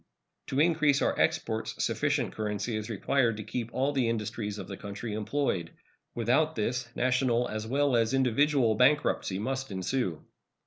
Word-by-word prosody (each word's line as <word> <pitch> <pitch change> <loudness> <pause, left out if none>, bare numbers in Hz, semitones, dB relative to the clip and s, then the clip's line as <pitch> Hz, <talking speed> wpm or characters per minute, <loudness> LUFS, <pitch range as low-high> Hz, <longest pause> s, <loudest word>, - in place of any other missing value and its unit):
To 135 - -1
increase 155 -3 +3
our - - +1
exports - - 0
sufficient - - 0
currency 110 +2 -2
is 110 +1 -4
required 115 +1 +1
to 110 - -5
keep 115 +2 -4
all 135 +2 0
the 130 -5 +1
industries 105 -2 -3
of 95 - -7
the 95 - -6
country 105 +3 -6
employed. 105 -5 -1 0.5
Without 130 +7 +2
this 120 +2 -2
national 125 -1 +2
as 110 0 -4
well 140 +1 +2
as 115 -1 +2
individual 135 -1 +3
bankruptcy 125 -5 +2
must 130 +6 -3
ensue. 95 - -2
120 Hz, 150 wpm, -29 LUFS, 105-135 Hz, 0.5 s, increase